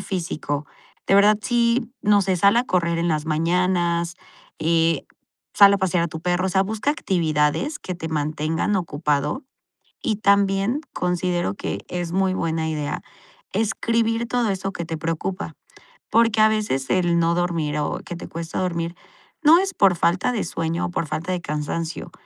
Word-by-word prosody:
físico. 155 -6 -3 0.4
De - - +3
verdad, 205 +1 +6
sí, 235 +1 +1
no 205 -1 +4
sé, 190 -1 +1
sal 200 +5 +4
a 240 - +3
correr 170 -6 0
en 170 - 0
las 155 -1 -1
mañanas, 170 +1 +1 0.4
eh, 165 -1 +2 0.5
sal 200 0 +8
a - - 0
pasear 180 -3 +1
a - - -2
tu 160 0 -7
perro, 180 +2 0
o - - 0
sea, 190 +1 +2
busca 220 +7 -1
actividades 170 - 0
que 185 - -5
te 165 -1 -6
mantengan 155 +5 -1
ocupado. 150 - -1 0.6
Y 215 -3 +1
también 200 +5 +2
considero 180 - -1
que 100 - -5
es 175 -1 -4
muy 190 0 +1
buena 160 -3 -1
idea 150 -2 -3 0.5
escribir 230 +1 0
todo 240 -2 0
eso 195 0 -2
que 170 - -4
te 160 -1 -4
preocupa, 165 +5 -3 0.6
porque 230 -1 +3
a 215 - +7
veces 205 -12 -1
el 175 -2 +2
no 170 0 +2
dormir 165 -4 -1
o 150 - -2
que 175 - -6
te 170 - -8
cuesta 165 0 -5
dormir 170 -1 -2 0.5
no 320 +3 +7
es 385 -1 -1
por 195 -3 +4
falta 175 +7 +2
de 230 -4 -2
sueño 165 +1 -2
o - - -3
por 170 - -1
falta 160 +5 -3
de 180 - -2
cansancio, 150 +1 -4
175 Hz, 170 wpm, -23 LUFS, 165-200 Hz, 0.6 s, sal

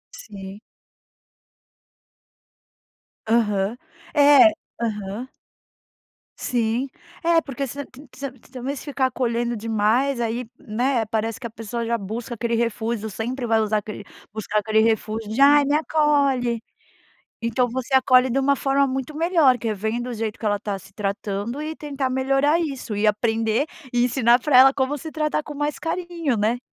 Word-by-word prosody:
Sim. 195 -1 -9 2.7
Aham, 215 -1 +1 0.4
é, 290 +1 +7 0.3
aham. 210 +2 -3 1.1
Sim, 240 +1 0 0.4
é 335 -1 +4
porque 275 -1 -4
você 285 +2 -6
te 260 - -15
você 275 -1 -5
te 255 -1 -22
também 260 +2 -4
se - - -8
ficar 275 -2 0
acolhendo 240 -1 -1
demais 225 +4 +1
aí, 235 +1 -2
né, 240 +2 0
parece 225 +2 -2
que 255 - -8
a - - -3
pessoa 230 +1 -5
já 235 0 0
busca 225 +4 -5
aquele 235 0 -1
refúgio, 225 -1 -1
sempre 240 +5 -4
vai 225 -1 +3
usar 215 0 +1
aquele, 210 0 -6 0.3
buscar 215 0 -1
aquele 215 +1 +1
refúgio 220 -1 0
de 225 - -3
ai 290 +1 +7
me 285 +1 +1
acolhe. 280 -6 +2 0.8
Então 245 +2 +1
você 260 +2 -4
acolhe 260 -1 +5
de 260 +3 +1
uma 280 +1 +3
forma 275 0 +2
muito 265 +2 -3
melhor 320 -5 +4
que 235 - -4
é 220 - +1
vendo 220 +4 -3
o - - -4
jeito 220 -1 -4
que 220 - -6
ela 205 -1 +1
tá 205 -2 -4
se 195 +1 -17
tratando, 205 +5 -3
e 310 +1 -4
tentar 280 -4 -3
melhorar 270 +5 +2
isso, 270 -9 -4
e 205 - 0
aprender 225 +3 +1 0.3
e 245 0 +3
ensinar 245 -1 +4
pra 265 0 +3
ela 270 +1 +8
como 275 +2 -1
se 315 +3 -8
tratar 305 -1 -1
com 295 - -8
mais 295 0 -2
carinho, 335 -5 -2
né. 215 +4 +1
240 Hz, 160 wpm, -23 LUFS, 220-275 Hz, 2.7 s, ela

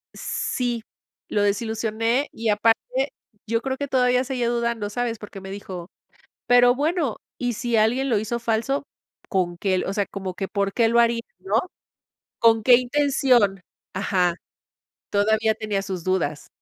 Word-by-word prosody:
Sí, 240 -2 -2 0.5
lo 205 -1 +1
desilusioné 225 +5 0
y 225 0 -4
aparte 230 - +1 0.4
yo 230 +1 0
creo 265 +1 -2
que 285 - -3
todavía 250 -1 +3
seguía 250 -2 -2
dudando, 235 -3 -1
¿sabes? 230 0 -2
Porque 200 -2 -9
me 190 0 -8
dijo: 190 -3 -7 0.6
"Pero 245 0 +6
bueno, 295 - 0 0.2
y 245 -1 -1
si 235 +1 -1
alguien 245 +5 +2
lo 220 -4 +2
hizo 225 +3 -2
falso, 235 +5 0 0.5
¿con 175 -2 -1
qué?". 190 -1 +1
O 195 - -2
sea, 200 -1 0
como 190 -2 -5
que, 195 0 -4
por 200 -1 -1
qué 230 -2 +3
lo 235 +1 +4
haría, 235 0 +3 0.2
¿no? 195 +3 -4 0.8
¿Con 225 -1 +4
qué 245 +2 +7
intención? 250 -6 +2 0.3
Ajá. 185 -3 +1 0.8
Todavía 220 +2 +2
tenía 210 -2 -2
sus 190 -3 -5
dudas. 165 -6 -1
225 Hz, 150 wpm, -23 LUFS, 200-245 Hz, 0.8 s, qué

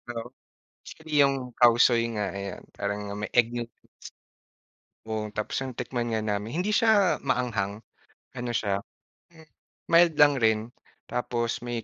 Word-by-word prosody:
oo, 115 +1 -6 0.6
actually 150 -2 -3
yung 135 -3 +2
cow 120 -2 +7
soy 120 -1 +4
nga 105 -2 -2
ayan 100 -1 -6
parang 100 +1 -3 0.2
may 105 - -3
egg 120 -1 +4
noodles. 120 -1 -5 1.3
Oo 110 -1 -3
tapos 105 +4 -3
nung 130 -2 -6
tikman 120 -2 -3
nga 110 -1 0
namin 105 +1 -2
hindi 210 +4 0
siya 210 -4 +3
maanghang, 110 -7 -1 0.6
ano 120 0 -3
siya, 100 -3 0 0.5
m 160 -1 -17 0.4
mild 170 -1 +5
lang 145 -1 +7
rin 110 -3 +3 0.5
tapos 120 -1 -2
may 120 -1 -4
120 Hz, 140 wpm, -27 LUFS, 110-135 Hz, 1.3 s, cow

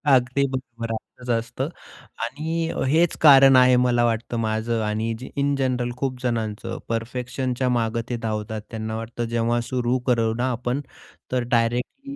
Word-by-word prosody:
अगदी 130 +2 +2
बरोबर. 120 -3 -5
असंच 125 +2 -9
असतं 120 +5 -1 0.5
आणि 160 +6 -2
अ, - - -3
हेच 165 +4 +3
कारण 135 -3 +8
आहे 125 0 +7
मला 120 -1 +3
वाटतं 115 +1 -1
माझं 110 +1 -1
आणि 110 +2 -1
ज 130 - -7
इन 140 0 +2
जनरल 125 -2 0
खूपजणांचं. 125 -5 -2
परफेक्शनच्या 125 +2 -2
मागे 115 -1 0
ते 120 - -1
धावतात. 110 -1 -3
त्यांना 110 0 -4
वाटतं, 115 +1 -4
जेव्हा 115 +1 0
सुरू 125 0 +1
करू 115 -2 +2
ना 125 +2 0
आपण, 125 +3 -2 0.5
तर 125 -1 +1
डायरेक्टली 125 - -1
120 Hz, 150 wpm, -23 LUFS, 115-130 Hz, 0.5 s, कारण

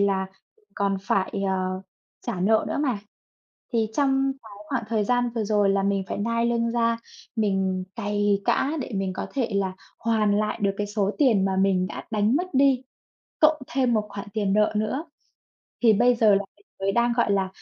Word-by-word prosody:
là 195 -1 +1 0.5
còn 200 -1 0
phải, 195 -1 0 0.2
ờ, 185 0 -1 0.4
trả 200 -7 -2
nợ 220 +3 +3
nữa - - -2
mà. 250 -7 0 0.8
Thì 225 -1 +2
trong 270 -1 +2
cái 220 - -13 0.2
khoảng 255 -5 -1
thời 220 -2 +1
gian 245 +2 +1
vừa 220 - 0
rồi 205 -1 +2
là 195 0 +2
mình 200 -1 +1
phải - - -3
nai 230 +2 0
lưng 235 -1 +1
ra, 230 -1 +1 0.4
mình 190 -3 0
cày 205 -1 0
cã 280 - +2
để 245 - -6
mình 190 -1 -1
có - - -4
thể 255 -5 0
là 190 -2 0 0.3
hoàn 215 -3 +2
lại 215 - -1
được 200 -1 +2
cái 205 0 -2
số 205 -1 0
tiền 225 -10 +4
mà 190 -1 0
mình 190 -1 +2
đã - - -7
đánh 215 +4 +2
mất 360 0 -2
đi, 265 -1 +4 0.6
cộng 310 -2 +4
thêm 255 -3 +2
một 215 -1 +1
khoản 200 0 -7
tiền 205 -3 0
nợ 210 +1 +3
nữa. 215 +9 -1 0.8
Thì 225 -2 +7
bây 245 +4 +4
giờ 220 -3 +5
là 200 0 +1
mình 205 - -28
mới 195 0 +1
đang, 235 +1 +2
gọi 235 -4 +2
là, 195 -1 +1
210 Hz, 200 wpm, -25 LUFS, 195-235 Hz, 0.8 s, Thì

